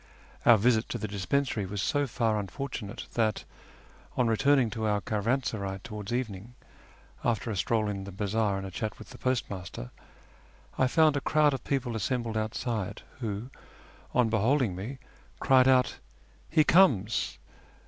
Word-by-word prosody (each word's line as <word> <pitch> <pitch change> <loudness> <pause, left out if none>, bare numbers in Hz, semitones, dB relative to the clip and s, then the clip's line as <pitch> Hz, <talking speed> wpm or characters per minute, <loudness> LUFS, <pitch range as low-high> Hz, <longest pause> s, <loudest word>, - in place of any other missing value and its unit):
Our 120 - +9
visit 115 +1 +2
to - - -2
the 110 - -4
dispensary 105 +2 -1
was 100 +2 -4
so 145 +8 +1
far 115 -4 0
unfortunate 115 0 -5
that, 110 -3 +1 0.7
on 125 - +3
returning 130 +1 +3
to 110 -2 -2
our 105 -1 +2
caravansaray 105 -2 -1
towards 105 -1 -6
evening, 120 -2 -3 0.7
after 115 -1 0
a - - -2
stroll 110 +1 +1
in 100 -2 -3
the 100 - -7
bazaar 105 +1 0
and 95 - -5
a 95 - -6
chat 110 +4 -4
with 110 - -12
the - - -12
postmaster, 95 - -3 0.8
I 130 - +3
found 155 +2 +4
a - - -1
crowd 150 0 +3
of 135 - -4
people 125 -4 -1
assembled 115 +2 -1
outside, 110 -2 -2 0.2
who, 110 +1 -4 0.6
on 120 -2 +3
beholding 115 -1 +2
me, 110 +9 -6 0.4
cried 130 -1 +5
out, 130 -1 +3 0.2
" - - -30 0.2
He 155 -1 +4
comes 125 - +3
115 Hz, 155 wpm, -29 LUFS, 105-130 Hz, 0.8 s, Our